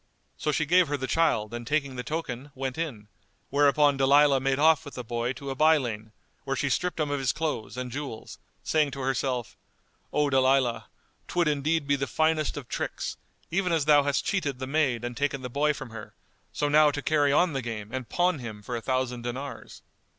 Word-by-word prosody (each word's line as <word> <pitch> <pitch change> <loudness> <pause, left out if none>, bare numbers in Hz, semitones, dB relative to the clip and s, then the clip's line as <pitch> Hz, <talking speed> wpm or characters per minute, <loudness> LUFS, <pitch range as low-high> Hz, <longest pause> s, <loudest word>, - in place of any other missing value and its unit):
So 150 - -1
she 150 +1 0
gave 180 +2 +4
her 145 0 -1
the 130 - -3
child 130 -9 +1
and 120 -1 -6
taking 140 -2 0
the 125 - -3
token, 145 -2 -4
went 130 -1 -3
in; 135 -11 -4 0.4
whereupon 145 0 +4
Dalilah 140 +1 +5
made 135 0 +1
off 160 +1 +4
with 145 - -10
the 125 - -5
boy 120 +1 -2
to 140 0 -6
a - - -4
by 155 +3 +5
lane, 110 -5 -4 0.3
where 135 0 -2
she 140 0 -1
stripped 180 +3 -1
him 150 -2 0
of 145 - 0
his 130 -3 +1
clothes 150 -7 -3
and 125 -1 -4
jewels, 135 -4 -7 0.2
saying 155 -2 +2
to 135 - -5
herself, 130 -2 -1 0.6
"O 150 0 +2
Dalilah, 130 -2 +2 0.4
'twould 175 -2 +1
indeed 150 +1 +1
be 140 0 +2
the 135 0 -2
finest 155 0 +1
of 135 -5 -7
tricks, - - -4 0.3
even 180 +1 +1
as 160 -4 +1
thou 150 -1 +6
hast 140 -1 0
cheated 150 -10 -1
the 130 - -4
maid 135 -4 0
and 120 0 -4
taken 140 -1 -1
the 125 - -4
boy 150 +3 +2
from 135 -5 -7
her, 110 -1 -10 0.4
so 145 - -1
now 150 +1 +6
to 145 -1 -4
carry 145 -2 +3
on 170 +3 +3
the 135 - -1
game 110 -3 -6
and 130 -4 -4
pawn 175 -3 +1
him 110 -4 -8
for 120 - -4
a 115 - -3
thousand 130 0 -1
dinars." 125 +1 -7
140 Hz, 210 wpm, -27 LUFS, 125-150 Hz, 0.6 s, thou